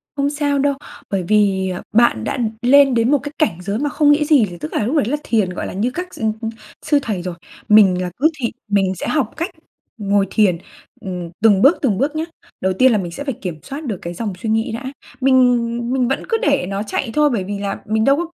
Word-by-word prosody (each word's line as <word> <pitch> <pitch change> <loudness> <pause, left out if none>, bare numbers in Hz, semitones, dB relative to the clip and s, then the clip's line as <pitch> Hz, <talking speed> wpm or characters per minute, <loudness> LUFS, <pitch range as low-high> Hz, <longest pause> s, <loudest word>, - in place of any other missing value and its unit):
Không 280 0 0
sao 285 -1 0
đâu, 280 0 +2 0.4
bởi 195 -2 -1
vì, 195 -3 +2 0.2
bạn 220 - +3
đã - - -2 0.2
lên 275 +2 +5
đến 235 +3 +2
một 290 - +4
cái 290 - -5
cảnh 290 - +1
giới 200 +4 -3
mà 290 +1 0
không 290 0 +3
nghĩ 300 +1 +3
gì, 290 -8 +4
thì 175 - -9
tức 155 -1 -7
là - - 0
lúc 275 +7 -1
đấy 290 - +2
là 275 +7 -1
thiền, 215 -5 +1
gọi 180 - -5
là, - - -7
như 220 +6 -1
các 360 +5 -6
s - - -11
ừm, 220 -1 +1
ừm, 225 - -2 0.4
sư 295 -2 +3
thầy 210 -9 -3
rồi. 180 -1 -5 0.3
Mình 195 -4 +6
là 180 -1 -3
cứ 305 +5 +4
thị 235 -3 -1 0.2
mình 195 -2 +1
sẽ - - -5
học 285 -8 0
cách 335 +4 -2 0.5
ngồi 200 -1 +1
thiền, 195 -6 +3 0.4
ừm, 180 -3 -5
từng 205 -3 +5
bước 285 +6 +6
từng 220 -9 +1
bước 290 +4 0
nhá. 315 - -1 0.4
Đầu 190 0 +1
tiên 255 +7 +4
là 220 - +3
mình 175 -3 -4
sẽ 285 - -6
phải 275 -3 -2
kiểm 175 -7 -6
soát 285 +3 -7
được 210 -7 -3
cái 170 - -5
dòng 205 +2 -4
suy 220 - -3
nghĩ 225 0 0
đã, 230 +4 -5 0.4
mình 265 0 +4
ừm, 240 -2 +2
ừm, 240 0 -3
mình 255 -2 +1
vẫn 270 - -1
cứ 455 - +2
để 280 -9 +2
nó 200 +1 -2
chạy 225 +2 -3
thôi, 300 0 +3
bởi 230 -8 -1
vì 200 +1 -5
là 200 -1 -3
mình 220 +1 0
đâu 275 - +5
có 340 - -1
225 Hz, 260 wpm, -19 LUFS, 195-280 Hz, 0.5 s, Mình